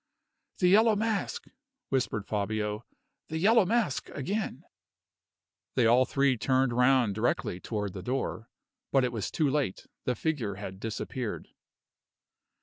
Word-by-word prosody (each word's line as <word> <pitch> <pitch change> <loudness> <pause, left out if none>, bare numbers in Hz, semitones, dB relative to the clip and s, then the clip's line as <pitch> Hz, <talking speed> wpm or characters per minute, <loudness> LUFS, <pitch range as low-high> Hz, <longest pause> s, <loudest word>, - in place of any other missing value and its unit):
"The 180 - +3
Yellow 215 +4 +6
Mask!" 215 -1 -1 0.4
whispered 115 -6 0
Fabio. 105 +1 -2 0.4
"The 160 - -3
Yellow 210 +4 +5
Mask 225 - 0
again!" 185 - -3 1.1
They 125 - +3
all 120 +3 +5
three 140 -2 +2
turned 130 +1 +2
round 125 -3 +4
directly 110 -4 -1
toward 105 -2 -3
the 95 - -6
door. 120 0 -3 0.4
But 135 -1 +4
it 125 - 0
was 110 -4 -3
too 155 - +1
late 135 -8 -1 0.2
the 125 - +1
figure 120 -8 -2
had 95 -1 -7
disappeared. 115 +2 -4
125 Hz, 130 wpm, -29 LUFS, 110-155 Hz, 1.1 s, Yellow